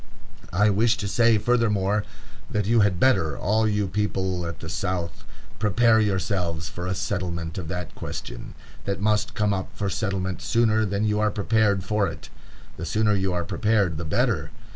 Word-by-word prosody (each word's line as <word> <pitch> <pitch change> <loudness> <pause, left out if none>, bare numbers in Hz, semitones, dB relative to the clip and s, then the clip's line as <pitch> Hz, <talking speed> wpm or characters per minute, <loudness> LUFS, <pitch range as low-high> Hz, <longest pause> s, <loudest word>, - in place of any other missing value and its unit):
"I 105 +4 +3
wish 115 +4 +2
to 105 -3 -3
say, 115 +2 +4
furthermore, 105 -3 +1 0.5
that 105 -2 -1
you 115 +2 +3
had 100 -4 +2
better, 80 - +3
all 110 +3 +1
you 105 -2 0
people 95 -3 -1
at 85 -3 -6
the 80 - -8
South, 85 +2 -3 0.4
prepare 110 +2 +4
yourselves 90 -5 -1
for 85 +5 -5
a 95 - -1
settlement 90 -4 -3
of 85 - -6
that 90 0 -5
question, - - -7 0.3
that 100 0 -2
must 105 +1 +1
come 105 -1 +1
up 95 -1 -3
for 100 -2 -1
settlement 95 -2 -2
sooner 110 -2 +2
than 100 +2 -1
you 105 0 +1
are 105 0 +3
prepared 105 -2 +1
for 105 +1 +1
it. - - -8 0.5
The 85 - -5
sooner 105 +3 +2
you 95 -1 0
are 90 -1 -1
prepared 105 -7 +1
the - - -3
better. 80 - 0
100 Hz, 175 wpm, -25 LUFS, 90-110 Hz, 0.5 s, say